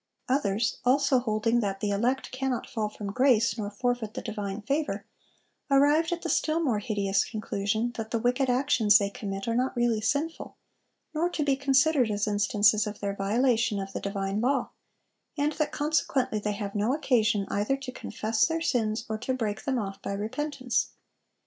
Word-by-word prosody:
Others, 225 -4 +1
also 270 +1 +3
holding 230 0 +1
that 195 -3 -2
"the 205 0 -1
elect 240 +6 0
cannot 260 -1 -2
fall 220 -5 -2
from 205 -1 -6
grace 250 -1 +3
nor 210 -3 -3
forfeit 235 0 -2
the - - -4
divine 205 -1 -4
favor," 275 -5 -1 0.6
arrived 290 +4 +4
at 345 -1 -3
the - - -2
still 310 +2 +1
more 255 -10 +1
hideous 200 -2 0
conclusion 215 +1 -2
that 220 -1 -4
"the 230 - 0
wicked 250 +3 +1
actions 245 -5 +4
they 200 -2 -1
commit 195 -1 -5
are 230 - +1
not 255 +3 0
really 240 -2 +1
sinful, 290 +9 -2 0.6
nor 330 +3 +1
to 320 -3 -2
be 280 -2 +2
considered 270 -1 +3
as 205 0 0
instances 210 0 +3
of 210 0 -6
their 200 -1 -2
violation 225 +1 +1
of 195 0 -6
the - - -4
divine 195 +1 -2
law, 265 +2 +1 0.7
and 290 +1 +1
that 305 0 -1
consequently 290 -6 0
they 210 0 -2
have 200 -1 -5
no 215 +6 +1
occasion 230 -8 +2
either 210 +7 0
to 270 -2 -7
confess 220 -3 0
their 325 0 -1
sins 225 -7 0
or 220 -1 -3
to 255 +3 -2
break 220 +1 -3
them 265 -3 0
off 195 -4 -4
by - - -4
repentance." 255 +5 -2
230 Hz, 180 wpm, -28 LUFS, 210-270 Hz, 0.7 s, arrived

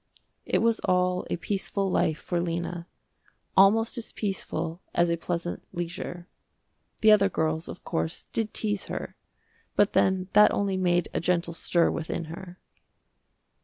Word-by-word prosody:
It - - +2
was 230 -1 +3
all 180 0 +1
a - - -1
peaceful 195 +1 -1
life 160 -3 +1
for 175 -1 -2
Lena, 170 0 -3 0.7
almost 225 +5 +5
as 225 - -5
peaceful 170 -4 -3
as 175 0 +3
a - - +2
pleasant 175 +1 -3
leisure. 175 0 -5 0.7
The 220 -1 +7
other 200 -2 +5
girls, 160 -1 -1
of - - -9
course, 165 -1 -3
did 225 -1 -2
tease 205 -2 -1
her, - - -5 0.6
but 205 - +3
then 190 -1 +2
that 210 +1 +8
only 200 -1 0
made 175 -2 +2
a - - 0
gentle 170 0 0
stir 170 0 +2
within 165 +1 -3
her. 180 0 -9
180 Hz, 145 wpm, -27 LUFS, 170-200 Hz, 0.7 s, that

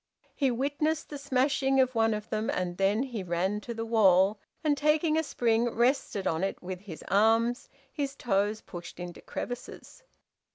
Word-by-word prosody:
He 275 -3 +1
witnessed 290 +5 -1
the 290 - -6
smashing 270 0 +1
of 255 -1 +3
one 225 -1 +2
of 210 +1 -6
them, 215 +1 -1
and 180 -1 -2
then 200 +5 +2
he 240 -6 -4
ran 185 +4 -1
to 235 - -7
the 225 0 -3
wall, 200 -3 +4 0.2
and 300 -2 +3
taking 305 +2 +2
a 320 - +3
spring, 240 -5 +1
rested 235 -4 +1
on 160 +3 0
it 195 - -2
with 185 0 -6
his 185 -5 -10
arms, 225 +4 +3 0.2
his 280 -2 -3
toes 210 -3 0
pushed 175 -1 -9
into 175 -1 -7
crevices. 245 - -7
225 Hz, 170 wpm, -29 LUFS, 195-270 Hz, 0.2 s, wall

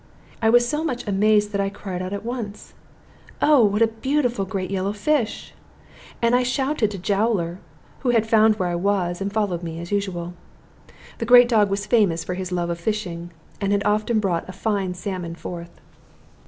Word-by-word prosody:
I 225 - +4
was 240 +1 +5
so 300 +4 -1
much 255 -8 -3
amazed 210 +1 +3
that 200 -1 0
I 195 - 0
cried 195 -2 -6
out 185 0 -4
at 200 +2 -5
once, 230 -4 -6 0.7
"Oh! 295 -5 +5
what 210 +1 +3
a - - +5
beautiful 245 -1 -1
great 190 -1 -4
yellow 195 +1 -1
fish!" 225 +2 -1 0.7
And 235 +1 +4
I 250 - +4
shouted 260 -2 0
to 205 - -6
Jowler, 195 -2 0 0.4
who 255 - -1
had 230 -2 +3
found 220 -1 +5
where 185 -4 -1
I 175 - -1
was, 180 -1 0
and 200 +1 -2
followed 205 -5 -1
me, 165 -1 -6
as 170 +2 -8
usual. 180 -4 -2 0.9
The 230 - -3
great 245 0 +8
dog 215 -4 +3
was 200 +1 -2
famous 195 -9 +2
for 180 - -4
his 185 0 -5
love 175 -1 -1
of 170 - -4
fishing, 175 -4 -3 0.3
and 200 0 0
had 200 0 +1
often 215 +2 +1
brought 185 -4 -1
a - - -6
fine 195 -2 -1
salmon 180 -2 -5
forth. 170 0 -8
205 Hz, 190 wpm, -23 LUFS, 185-225 Hz, 0.9 s, great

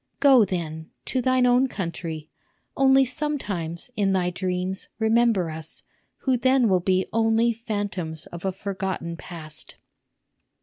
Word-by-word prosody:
Go, 270 -5 +7
then, 160 -4 -3 0.2
to 260 - 0
thine 255 0 +3
own 250 +2 +4
country; 165 - -5 0.4
only 270 0 +5
sometimes, 250 - -3
in 195 -3 +2
thy 180 -1 +1
dreams, 185 +1 -2
remember 220 -6 +2
us, 160 0 -5 0.4
who 260 -2 +2
then 260 0 +3
will 185 -3 +3
be 185 +1 +1
only 225 +1 +3
phantoms 205 -8 -3
of 170 - -7
a 190 - 0
forgotten 190 -3 -4
past." 155 -2 -7
195 Hz, 130 wpm, -25 LUFS, 170-240 Hz, 0.4 s, Go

